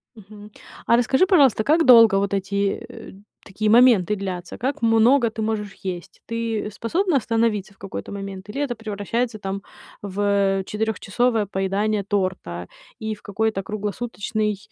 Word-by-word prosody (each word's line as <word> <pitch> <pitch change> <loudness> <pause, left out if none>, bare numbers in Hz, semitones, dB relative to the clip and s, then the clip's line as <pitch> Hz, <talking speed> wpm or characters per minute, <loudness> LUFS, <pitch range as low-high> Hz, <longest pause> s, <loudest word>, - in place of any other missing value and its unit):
Мгм, 210 0 -13 0.4
а 235 - +5
расскажи, 265 +8 +3
пожалуйста, 280 - +4
как 320 +5 +3
долго 230 -5 +8
вот 200 0 0
эти, 200 +1 -1
э, - - -11 0.3
такие 210 +2 -2
моменты 225 -5 +5
длятся? 185 -3 -6
Как 265 +2 -3
много 230 +2 +4
ты 220 0 -5
можешь 210 -2 -3
есть? 185 -1 -6
Ты 230 -2 -3
способна 330 - 0
остановиться 225 -4 0
в 195 - -27
какой-то 195 -1 -7
момент 195 -1 -7
или 225 +7 -5
это 275 -4 -1
превращается 220 +2 -3
там 195 -1 -5 0.4
в, 200 0 -5 0.4
э, - - -6
четырёхчасовое 220 +1 0
поедание 200 +2 -1
торта 185 - -3 0.3
и 220 0 -3
в 210 - -19
какой-то 210 0 -1
круглосуточный, 210 0 -3
215 Hz, 145 wpm, -22 LUFS, 195-230 Hz, 0.4 s, долго